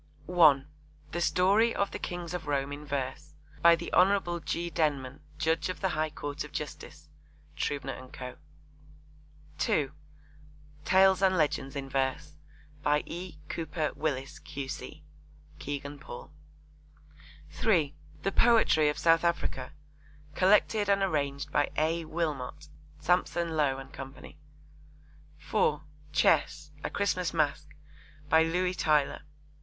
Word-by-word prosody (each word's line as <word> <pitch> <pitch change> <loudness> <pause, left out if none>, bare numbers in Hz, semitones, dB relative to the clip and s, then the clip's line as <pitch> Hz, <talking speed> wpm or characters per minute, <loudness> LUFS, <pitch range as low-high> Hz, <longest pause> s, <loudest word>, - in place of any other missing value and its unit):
(1) 155 -6 +5 0.4
The 175 - -2
Story 200 +7 +3
of 200 - 0
the - - -5
Kings 175 -1 -5
of 170 -4 -5
Rome 140 -1 0
in 145 +1 -7
Verse. 135 -2 -4 0.3
By 170 0 +8
the - - -7
Hon. 180 -2 +3
G. 170 +3 -2
Denman, 140 -4 -1 0.2
Judge 160 0 0
of 185 - -4
the 190 - 0
High 155 -1 0
Court 145 -1 -5
of - - -10
Justice. - - -7 0.5
(Trubner 140 -2 -2
and 130 0 -11
Co.) 125 -1 -8 1.2
(2) 145 -3 +1 0.9
Tales 190 0 +5
and 190 -1 +4
Legends 145 -3 0
in 140 -1 -4
Verse. 135 +3 -2 0.4
By 150 +1 +2
E. 175 -1 -7
Cooper 160 -1 -2
Willis, 135 -3 -3
Q.C. 140 -2 -7 0.6
(Kegan 145 0 -5
Paul.) 485 0 -10 1.2
(3) 160 -10 +2 0.3
The 195 - +1
Poetry 220 -10 +4
of 150 - -2
South 165 0 +4
Africa. 170 -6 -1 0.6
Collected 205 +3 +3
and 200 -1 +3
arranged 140 -6 -1
by 145 - +2
A. 160 +2 +1
Wilmot. 150 -2 -3 0.3
(Sampson 170 0 +1
Low 145 -3 +2
and 135 0 -10
Co.) 135 -1 -7 1.3
(4) 150 0 0 0.3
Chess. 150 -1 +2
A - - -1
Christmas 185 -4 -1
Masque. 155 0 0 0.5
By 160 +1 +6
Louis 180 +3 +1
Tylor. 150 -5 +1
155 Hz, 125 wpm, -29 LUFS, 145-175 Hz, 1.3 s, By